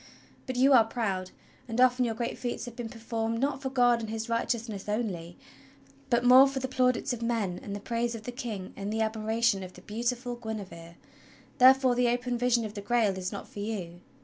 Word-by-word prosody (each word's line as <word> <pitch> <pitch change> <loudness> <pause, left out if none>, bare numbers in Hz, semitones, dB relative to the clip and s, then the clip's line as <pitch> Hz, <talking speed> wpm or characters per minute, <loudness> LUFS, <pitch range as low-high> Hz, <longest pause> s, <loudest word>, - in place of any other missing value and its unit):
But 255 - -3
you 265 +3 +5
are 240 -3 +8
proud, 200 -5 -2 0.4
and 230 0 -3
often 255 0 +5
your 225 -2 -2
great 235 +1 -3
feats 240 -1 -4
have 240 -1 -9
been 235 -2 -5
performed 225 0 -3
not 275 +1 -1
for 265 - -2
God 245 -2 +3
and 220 -2 -5
his 225 +1 -4
righteousness 230 -3 -2
only, 185 -6 -3 0.7
but 240 -1 +2
more 255 +2 +8
for 275 0 -4
the 260 0 -2
plaudits 255 -1 +1
of 240 - -6
men, 225 -6 -1
and 200 - -6
the - - -5
praise 235 +2 -2
of 220 - -8
the 245 - -5
King 230 -7 -6
and 200 +1 -4
the 220 +1 -1
admiration 220 -1 +1
of 185 -1 -8
the 180 - -14
beautiful 240 +4 -3
Guinevere; 190 -7 -7 0.6
therefore 260 0 +6
the 245 0 +2
open 245 +1 -1
vision 240 -1 +2
of 210 - -6
the 205 - -6
Grail 215 -2 +1
is 185 0 -4
not 200 - -7
for - - -10
you. 195 -5 -4
230 Hz, 210 wpm, -29 LUFS, 210-245 Hz, 0.7 s, are